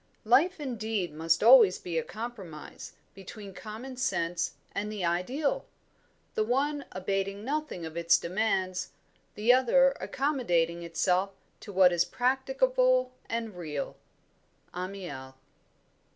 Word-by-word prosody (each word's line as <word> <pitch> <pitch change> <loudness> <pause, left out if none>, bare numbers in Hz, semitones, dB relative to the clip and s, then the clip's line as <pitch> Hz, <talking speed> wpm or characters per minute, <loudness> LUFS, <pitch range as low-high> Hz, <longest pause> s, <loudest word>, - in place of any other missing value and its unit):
"... - - -40
Life 310 - +3
indeed 220 - -3
must 165 +3 +1
always 230 -5 +8
be 170 -2 -3
a - - -3
compromise 215 -9 -8 0.2
between 195 +1 -10
common 225 +6 -8
sense 175 -9 -1 0.2
and 210 +1 -3
the 205 -4 -3
ideal, 245 - -1 0.7
the 215 - +1
one 280 +5 0
abating 195 +2 -2
nothing 295 - -3
of 160 0 -8
its 170 0 +4
demands, 185 0 -1 0.4
the 225 +4 +5
other 265 +2 +5
accommodating 175 - 0
itself 180 +3 0 0.2
to 205 - -9
what 185 -2 +5
is 170 - +3
practicable - - +2 0.2
and 225 -3 -3
real." 155 -5 -5 0.8
Amiel. 180 -8 -6
205 Hz, 120 wpm, -29 LUFS, 175-255 Hz, 0.8 s, always